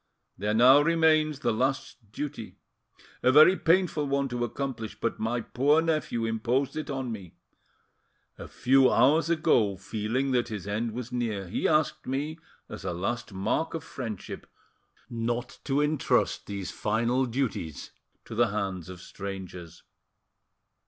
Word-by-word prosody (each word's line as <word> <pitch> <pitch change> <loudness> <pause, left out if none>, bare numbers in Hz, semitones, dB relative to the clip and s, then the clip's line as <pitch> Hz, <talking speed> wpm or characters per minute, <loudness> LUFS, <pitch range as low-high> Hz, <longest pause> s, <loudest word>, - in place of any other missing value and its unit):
There 105 +2 -1
now 130 +5 +7
remains 155 -2 +3
the - - +1
last 130 -2 -2
duty, 115 -8 -6 0.6
a 130 - +4
very 155 +7 +8
painful 170 -4 +2
one 140 0 0
to 120 -1 -2
accomplish, 120 -2 -4
but 115 - -2
my 115 +2 -1
poor 145 +7 +2
nephew 155 -8 0
imposed 120 +6 0
it 155 - -4
on 135 -3 -3
me. 95 -6 -8 1.0
A - - -7
few 130 0 +4
hours 150 +8 +4
ago, 140 - +2
feeling 115 +8 -2
that 120 -2 +1
his 105 -5 -6
end 110 +2 -2
was 125 +1 -6
near, 110 -6 -2
he 90 - -1
asked 155 -1 +1
me, 145 +5 -3 0.3
as - - -9
a - - -2
last 115 +7 -3
mark 100 +13 -1
of 160 - -5
friendship, 115 -7 -7 0.6
not 120 +1 -3
to 140 +1 +1
entrust 150 0 +1
these 100 -2 -5
final 120 +4 0
duties 115 - -3 0.3
to - - -9
the 120 +1 +3
hands 100 -4 -3
of 90 -1 -9
strangers." 95 -4 -8
120 Hz, 145 wpm, -28 LUFS, 105-140 Hz, 1.0 s, very